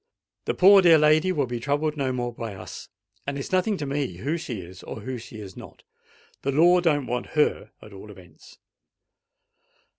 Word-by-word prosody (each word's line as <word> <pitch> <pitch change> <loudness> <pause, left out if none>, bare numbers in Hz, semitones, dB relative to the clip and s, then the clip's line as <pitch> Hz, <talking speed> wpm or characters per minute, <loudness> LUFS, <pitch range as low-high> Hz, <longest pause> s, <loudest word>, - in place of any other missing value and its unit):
The - - -1
poor 195 +1 +7
dear 170 -3 +7
lady 155 +4 +4
will 145 -6 0
be 120 -1 -4
troubled 145 +4 -1
no 135 -3 -1
more 120 -1 -3
by 115 -3 -6
us; 90 -1 -10 0.4
and 140 0 -3
it's 140 - -6
nothing 190 +2 +1
to 150 - -4
me 140 -8 -2
who 140 - -2
she 125 - -5
is, 90 +1 -12
or 110 - -8
who 130 +2 -5
she 110 -1 -11
is 95 -3 -10
not. - - -13 0.6
The 140 - -1
law 175 +5 +5
don't 150 -6 +1
want 125 0 -3
her, 150 - +1
at - - -13
all - - -11
events." - - -16
140 Hz, 190 wpm, -25 LUFS, 120-155 Hz, 0.6 s, poor